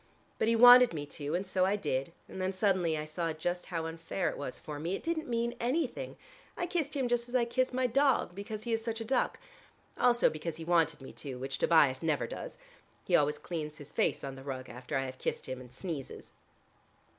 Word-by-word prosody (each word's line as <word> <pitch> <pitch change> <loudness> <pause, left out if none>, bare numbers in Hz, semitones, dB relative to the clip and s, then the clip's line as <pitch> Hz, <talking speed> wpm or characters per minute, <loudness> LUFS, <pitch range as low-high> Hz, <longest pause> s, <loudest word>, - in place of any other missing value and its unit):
But 220 - +2
he 230 - +4
wanted 245 0 +9
me 145 -2 -4
to, 145 +2 -4
and 185 +3 -1
so 185 -1 +1
I 195 +2 +3
did, 135 -8 -2 0.2
and 190 - -7
then 185 0 0
suddenly 185 -5 +1
I 150 - -3
saw 165 +2 -2 0.4
how 165 -3 -3
unfair 165 +3 -2
it - - -8
was 140 -3 -5
for 150 -1 -7
me. 170 +5 -1
It - - -7
didn't 330 -1 -2
mean 235 0 0
anything: 255 +2 -1 0.4
I 350 - 0
kissed 320 -4 -2
him 265 -3 +1
just 240 0 0
as 250 - -4
I 245 -2 +4
kiss 255 +2 +1
my 255 0 +1
dog, 265 -4 +2
because 210 +3 -6
he 235 - -2
is 225 0 0
such 225 0 -3
a 225 - -4
duck. 255 +2 +1 0.6
Also 240 -1 +5
because 155 +1 -3
he 165 0 -7
wanted 165 -4 +2
me 135 - -10
to, 135 -3 -7
which 135 +2 -4
Tobias 145 -6 +4
never 160 -3 +1
does: - - -7 0.5
he 180 - +2
always 150 -1 +3
cleans 155 -3 -5
his 145 0 -11
face - - 0
on 135 - -4
the 135 - -10
rug 130 -2 -5
after 125 +2 -4
I 135 - 0
have 130 0 -7
kissed - - -2
him, 130 -1 -5
and 125 -1 -13
sneezes." 145 0 -6
175 Hz, 225 wpm, -31 LUFS, 150-235 Hz, 0.6 s, wanted